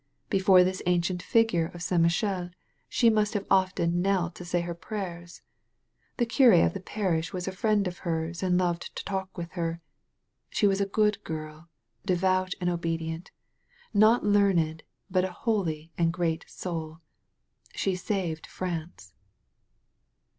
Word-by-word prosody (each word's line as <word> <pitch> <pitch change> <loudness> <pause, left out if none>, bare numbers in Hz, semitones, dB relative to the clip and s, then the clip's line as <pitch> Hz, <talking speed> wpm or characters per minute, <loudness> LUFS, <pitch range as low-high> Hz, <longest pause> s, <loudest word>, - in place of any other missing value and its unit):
Before 190 -2 +6
this 185 +1 -1
ancient 180 0 +1
statue 210 -7 +2
of 175 - -6
St. 170 0 +2
Michel 175 +1 +1 0.4
she 235 -2 +4
must 215 0 +1
have 200 - -1
often 185 -2 +2
knelt 185 -2 +1
to 180 - -9
say 175 0 0
her 170 0 -4
prayers. 175 -2 -7 0.7
The 240 - +2
cur£ 230 - +6
of - - 0
the 195 - -4
parish 180 -4 -1
was 180 0 -4
a - - -1
friend 205 +1 +1
of 180 +1 -6
hers 165 -1 -3
and 180 -2 +2
loved 175 -2 -1
to - - -5
talk 190 -1 -4
with 170 -1 -5
her. 165 -2 -3 0.7
She - - +1
was 195 0 +3
a 200 - +1
good 210 +1 +1
girl, 155 +1 -7 0.3
devout 185 +1 +1
and 180 - -1
obedient, 165 0 -2 0.6
not 215 +3 +5
learned, 190 -6 +3 0.3
but 185 -1 +3
a 190 - -2
holy 170 -7 -2
and 165 -1 +3
great 165 -2 -1
soul. 160 -3 -5 0.8
She 190 - 0
saved 180 -4 -3
France. 165 - -6
180 Hz, 150 wpm, -28 LUFS, 170-195 Hz, 0.8 s, Before